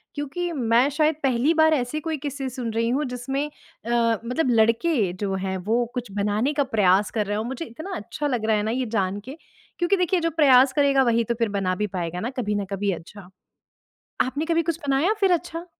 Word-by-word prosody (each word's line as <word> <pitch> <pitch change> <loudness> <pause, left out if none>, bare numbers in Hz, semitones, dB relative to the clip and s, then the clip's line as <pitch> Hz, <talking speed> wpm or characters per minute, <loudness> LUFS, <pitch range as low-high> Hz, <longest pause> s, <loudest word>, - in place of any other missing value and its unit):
क्योंकि 325 +5 -3
मैं 245 -3 +2
शायद 305 +1 +1
पहली 265 +4 +2
बार 315 -1 +4
ऐसे 265 +2 -1
कोई 320 0 -3
किस्से 280 -1 -4
सुन 245 -3 -4
रही 230 +1 0
हूँ 280 +5 0
जिसमें 260 +2 -3 0.4
अ, 230 -2 +1
मतलब 250 +3 0
लड़के 230 - +2
जो 195 +1 -3
हैं 190 0 -2
वो 225 +6 0
कुछ 245 -4 -5
बनाने 210 +7 0
का 285 -1 +1
प्रयास 205 -5 +2
कर 215 -2 -1
रहे 205 +1 -2
हों। 215 - -1
मुझे 265 +6 -5
इतना 315 +11 -7
अच्छा 295 +8 -4
लग 245 -6 -1
रहा 220 0 +3
है 205 - -1
ना 220 - -1
ये 255 +1 -1
जान 195 0 0
के 270 +5 -8 0.4
क्योंकि 365 +3 +2
देखिए 360 0 +1
जो 330 0 0
प्रयास 270 -4 +5
करेगा 280 -2 +3
वही 235 -2 +2
तो 235 - -1
फ़िर 230 -2 0
बना 195 -2 -1
भी 210 +3 -1
पाएगा 175 0 -3
ना 230 - -3
कभी 210 -3 -1
न 205 -1 -1
कभी 195 0 0
अच्छा। 180 +2 -9 0.9
आपने 280 +5 0
कभी 335 0 +2
कुछ 330 -1 -2
बनाया 280 +9 +2
फ़िर 385 -2 +4
अच्छा? 345 0 -2
250 Hz, 215 wpm, -24 LUFS, 210-295 Hz, 0.9 s, प्रयास